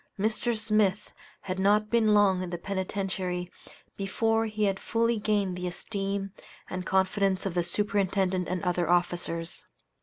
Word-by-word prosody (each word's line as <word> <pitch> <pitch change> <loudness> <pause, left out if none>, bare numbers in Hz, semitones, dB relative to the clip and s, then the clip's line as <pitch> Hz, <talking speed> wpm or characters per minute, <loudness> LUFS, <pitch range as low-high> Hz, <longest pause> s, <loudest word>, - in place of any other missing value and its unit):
Mr. 220 +3 +1
Smith 215 -2 +1 0.3
had 185 0 -4
not 210 +2 +3
been 225 -2 +4
long 195 -3 +4
in 185 - -4
the 175 - -3
Penitentiary 185 -1 -3 0.4
before 225 +3 0
he 215 0 -2
had 195 -2 +1
fully 230 0 +1
gained 205 -3 0
the 180 0 -3
esteem 195 +1 -3 0.4
and 185 0 -4
confidence 190 0 +1
of 195 - -1
the 175 - +2
Superintendent 190 -1 0
and 180 -1 -2
other 175 -2 0
officers. 175 -1 0
195 Hz, 145 wpm, -28 LUFS, 180-210 Hz, 0.4 s, been